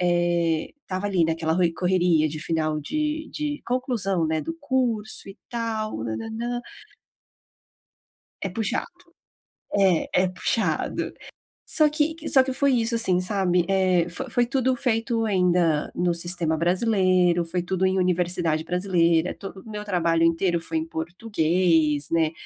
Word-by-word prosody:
eh, 175 -2 +1
estava 185 +2 -4
ali 180 -4 +2
naquela 160 0 0
roi 175 -1 +2
correria 175 -3 +2
de 155 +1 -6
final 155 -1 -1
de 305 - -2
de 295 -1 -3
conclusão, 225 -9 0
né, 160 0 0
do 330 - -5
curso 245 -8 -1
e 195 - -10
tal, 225 -2 -3
nã, 110 -1 -3
nã, 225 - -6
nã. 240 +2 -3 1.8
É 195 - -2
puxado. 200 +2 -2 0.9
É, 190 -4 +2
é - - +2
puxado. 185 +5 -1 0.5
Só 305 -2 +3
que 300 +1 0
que 330 -1 -6
só 265 - +6
que 260 0 -3
foi 275 0 +2
isso, 235 -1 +1
assim, 185 -6 +2
sabe, 180 -2 +1
eh, 185 -3 +2
fo 265 +9 -5
foi 240 +1 +2
tudo 260 0 +1
feito 230 -2 0
ainda 180 -6 +2
no 175 -1 +1
sistema 170 -1 0
brasileiro, 185 -1 +2
foi 175 +1 -2
tudo 185 +1 -2
em 190 0 +1
universidade 175 -3 +1
brasileira, 175 -2 +1
todo 195 -1 -9
o 220 - -14
meu 210 -1 -5
trabalho 170 -4 +1
inteiro 170 +1 +2
foi 165 0 -3
em 160 - -1
português, 165 -3 0
né, 160 -1 +2
185 Hz, 150 wpm, -24 LUFS, 170-225 Hz, 1.8 s, só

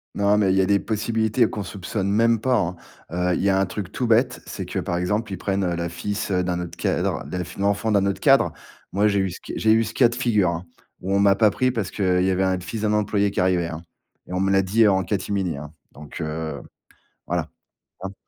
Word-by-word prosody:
Non, 100 +1 +3
mais 100 -3 +3
il - - +2
y - - +5
a - - +2
des 100 +1 +3
possibilités 110 +2 0
qu'on 105 - -4
soupçonne 95 +1 -4
même 115 +2 +3
pas, 130 +3 +1
hein. 90 -5 0 0.4
Heu, 90 +1 0
il - - -2
y 100 - +2
a 95 0 +3
un 95 - +2
truc 95 0 -6
tout 125 - -2
bête, 120 +2 +2
c'est - - -6
que, - - -5
par 85 - -1
exemple, 105 +5 -1
ils - - -4
prennent, 100 0 -1
heu, 90 -2 0
le 85 0 -3
fils, 100 +6 -4
heu, 90 -2 +1
d'un 90 -1 -1
autre 85 - -7
cadre, - - -1
l'ef 90 -1 -5
l'enfant 100 +2 0
d'un 100 -2 +3
autre 100 -1 -1
cadre. - - +4 0.4
Moi, 100 +3 +2
j'ai 100 -1 +1
eu 95 -1 -1
ce - - -9
c - - -7
j'ai 110 - +3
eu 115 +1 +4
ce 110 - -5
cas 120 -3 +5
de 120 - -6
figure, 110 -7 +2
hein, 85 +1 -5 0.4
où 95 +1 -1
on - - +3
m'a 100 0 +5
pas 105 +1 +4
pris 130 +5 +1
parce 110 -6 -2
qu'il 90 -3 +1
y 95 - +2
avait 95 0 +1
un 95 -1 +1
fils 105 +5 -6
d'un 105 -1 +1
employé 100 -1 +1
qui - - -3
arrivait, 90 -2 +2
hein, 80 0 -6 0.5
et - - -7
on 90 - -1
me 95 +1 +1
l'a 95 0 +4
dit 105 +4 +3
en 95 -2 +3
catimini, 95 -3 -2
hein. 75 +1 -9 0.2
Donc, 75 +3 -9
heu, 80 -2 -4 0.7
voilà, - - 0 0.6
tu 95 - -4
vois? 95 - -8
100 Hz, 260 wpm, -23 LUFS, 90-105 Hz, 0.7 s, y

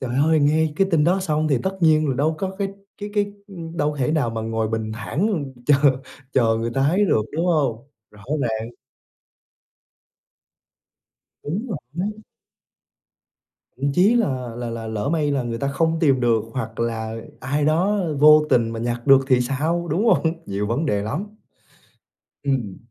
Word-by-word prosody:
Trời 130 -2 -4
ơi! 160 -1 +3
Nghe 155 +1 +2
cái 195 - +3
tin 155 -3 +3
đó 185 +3 +2
xong 155 -3 0
thì 135 -4 +2
tất 190 0 -2
nhiên 155 -2 +4
là 130 - 0
đâu 155 +5 +1
có 190 -1 -2
cái 195 -1 -1 0.3
cái 205 0 -5
cái 205 -1 0 0.4
đâu 150 -2 0
có - - -9
thể 130 +4 +1
nào 145 -8 +1
mà 115 -1 -4
ngồi 110 -1 -2
bình 110 -1 -3
thản 145 - -1 0.2
chờ 145 - +6 0.6
chờ 115 -3 +3
người 115 +1 -2
ta 135 +1 +2
ấy 195 +5 +3
được, 110 - +2
đúng 170 +2 0
hông? 140 -6 0 0.2
Rõ 105 0 -17 0.2
ràng. 110 -2 -2 2.8
Đúng 195 - -3
rồi! 170 - -4 1.7
Thậm 140 +2 -1
chí 195 +8 +4
là 130 - 0
là 120 -1 -4
là 115 -1 -5
lỡ 110 +2 -3
may 150 -3 +1
là 135 -3 0
người 115 -1 -4
ta 140 - -1
không 160 +3 0
tìm 135 -5 +3
được 115 -3 +2
hoặc 115 -2 -5
là 110 -1 -2 0.3
ai 145 +3 -1
đó 180 +7 +2 0.2
vô 150 +1 +7
tình 115 -2 +3
mà 115 - -5
nhặt 120 +1 -3
được 135 -1 +7
thì 125 -1 +4
sao, 155 +7 -1
đúng 190 +9 +1
hông? 165 -7 +3
Nhiều 100 +1 -2
vấn 130 +9 -1
đề 100 -6 0
lắm. 145 - -3 1.2
Ừm. 125 -9 -1
140 Hz, 175 wpm, -22 LUFS, 115-160 Hz, 2.8 s, vô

